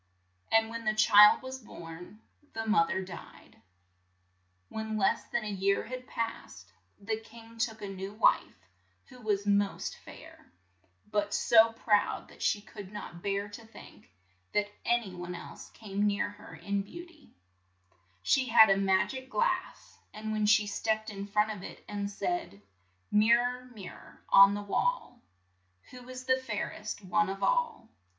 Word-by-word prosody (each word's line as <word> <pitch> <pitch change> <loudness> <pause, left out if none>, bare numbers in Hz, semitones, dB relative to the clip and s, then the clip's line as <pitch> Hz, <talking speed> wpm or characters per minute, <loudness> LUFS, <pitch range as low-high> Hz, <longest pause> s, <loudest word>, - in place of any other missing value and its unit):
And 225 0 +3
when 230 0 -5
the 215 -1 0
child 210 +2 +7
was 260 0 -6
born, 175 -1 -11 0.3
the 225 0 -4
moth 210 -7 +3
er 190 0 -1
died. 185 -2 -12 1.1
When 220 - -4
less 195 - +1
than 240 - -2
a - - -5
year 195 0 +1
had 255 +1 -7
passed, 95 - -6 0.3
the 220 +2 -3
king 230 0 -15
took 225 -2 -2
a - - -4
new 195 0 -6
wife, 215 - +1 0.4
who 250 -2 -14
was 205 -2 -1
most 200 -1 0
fair, - - -14 0.6
but 205 -1 0
so 225 -1 +5
proud 215 -2 +1
that - - -16
she 205 - +1
could 205 -3 -10
not 170 -4 -8
bear 200 +1 -1
to 205 +3 -10
think 225 - -15 0.5
that 205 0 +1 0.2
an 240 0 +3
y 180 - -10
one 175 0 -5
else - - -10
came 205 -1 -2
near 205 0 0
her 205 - -13
in 200 0 -2
beau 345 - -9
ty, 320 -5 -20 1.0
She 260 - +2
had 220 -5 +7
a 195 - +4
mag 190 +3 +2
ic 260 0 -8
glass, - - -2 0.2
and 215 0 -5
when 215 -1 0
she 215 0 +5
stepped 215 +1 -2
in 200 0 -6
front 210 +1 +1
of 205 -4 -7
it - - -10
and 200 -1 -3
said: 330 - -3 0.3
" 95 +1 -42
Mir 215 +3 +5
ror, 250 +1 -3
mir 195 -4 -8
ror - - -16
on 195 +1 +8
the 205 - -4
wall, 245 - -1 0.7
Who's 255 0 -9
the 260 0 +2
fair 235 -6 -4
est 210 -1 -7
one 210 +2 +2
of 195 0 -5
all - - 0
210 Hz, 170 wpm, -30 LUFS, 200-230 Hz, 1.1 s, on